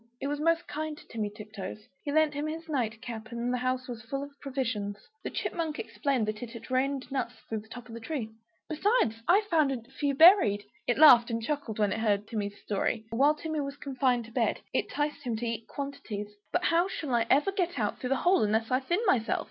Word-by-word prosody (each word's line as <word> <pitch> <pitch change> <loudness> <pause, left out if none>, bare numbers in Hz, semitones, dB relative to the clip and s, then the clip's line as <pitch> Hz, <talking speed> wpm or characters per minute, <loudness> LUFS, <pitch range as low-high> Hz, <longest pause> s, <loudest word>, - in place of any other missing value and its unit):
It - - -4
was 290 +1 -1
most 330 +2 +2
kind 310 0 -4
to - - -15
Timmy 215 -3 -3
Tiptoes; 210 0 -8 0.2
it 285 - -1
lent 315 -1 +4
him 290 +1 -2
its 320 +1 -5
night 240 -6 -2
cap; 220 -2 -7
and 235 +1 -2
the 250 - 0
house 255 0 -1
was 240 -3 -6
full 275 +5 -4
of 285 - -8
provisions. 230 -7 -2 0.3
The - - -3
Chipmunk 325 -3 -2
explained 265 -7 -1
that 215 0 -3
it 245 - -5
had 230 +2 -10
rained 270 +1 0
nuts 260 -3 -2
through 220 - -2
the 215 - -14
top 245 +1 -9
of 230 - -11
the 230 - -6
tree 230 -3 -4 0.4
"Besides, 315 - +1
I 390 +4 +6
found 325 -9 +2
a 250 -4 -3
few 280 +1 -1
buried!" 265 - +7 0.2
It 245 - +2
laughed 250 -6 +8
and 230 -1 -1
chuckled 245 -2 -3
when 210 -2 +2
it - - -3
heard 210 -2 +1
Timmy's 205 -2 -4
story. 215 +2 -1
While 280 +6 +4
Timmy 315 0 -3
was 280 0 -5
confined 260 -4 0
to 230 - -13
bed, - - 0
it - - 0
'ticed 295 0 -2
him 245 -5 -2
to 230 +2 -3
eat 230 -1 -3
quantities 225 -7 -5 0.2
"But - - +1
how 340 +2 +3
shall 300 -8 -4
I 230 -1 +2
ever 290 +8 +4
get 360 -5 -1
out 210 -3 -1
through 250 - -3
that 270 - +3
hole 370 +2 +5
unless 220 +2 +1
I 255 - +4
thin 345 - -1
myself? 250 - +2
255 Hz, 230 wpm, -29 LUFS, 225-295 Hz, 0.4 s, laughed